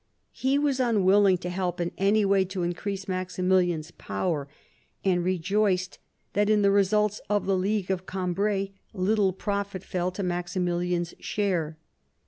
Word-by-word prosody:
He 265 +2 +1
was 285 -2 +1
un 230 -6 +2
willing 195 0 +5
to 180 - -5
help 180 -1 -2
in 175 0 -1
any 205 +2 +3
way 195 -1 +4
to 185 -1 -4
increase 195 +3 -3
Maximilian's 185 -3 0
power, 145 - -3 0.6
and 180 -2 +2
rejoiced 185 +1 0 0.3
that 205 +1 +2
in 210 -1 +4
the 200 - +5
results 210 +1 +2
of 205 -1 +1
the 195 - +2
League 195 +1 0
of 185 -1 -3
Cambrai 195 +2 -1 0.2
little 195 +1 +2
profit 200 0 -3
fell 180 0 -1
to 195 - -4
Maximilian's 175 -1 -1
share. 175 -7 -1
190 Hz, 145 wpm, -27 LUFS, 180-205 Hz, 0.6 s, willing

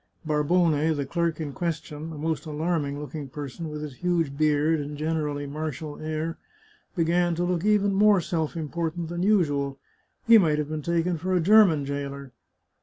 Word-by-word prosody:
Barbone, 155 0 +2
the 140 -1 -2
clerk 170 +2 -1
in 150 -3 -4
question, 160 -1 -4
a 155 - -8
most 160 +1 -2
alarming 150 -2 -1
looking 150 -1 -6
person, 145 +4 -6
with 150 0 -6
his 140 -4 -7
huge 170 -5 0
beard 155 +1 +2
and 145 0 -5
generally 150 -2 -2
martial 150 0 -5
air, 155 +1 -3 0.6
began 175 0 +2
to 175 - -1
look 175 -1 0
even 205 -1 +3
more 205 0 +5
self 165 -1 -2
important 165 +1 -3
than 175 0 -3
usual; 145 -9 +1 0.5
he 230 -2 +8
might 155 -6 +2
have 150 -1 -2
been 155 0 -3
taken 170 +1 0
for 185 +3 -1
a - - +3
German 180 -5 +5
jailer. 140 -1 -5
160 Hz, 170 wpm, -26 LUFS, 150-170 Hz, 0.6 s, he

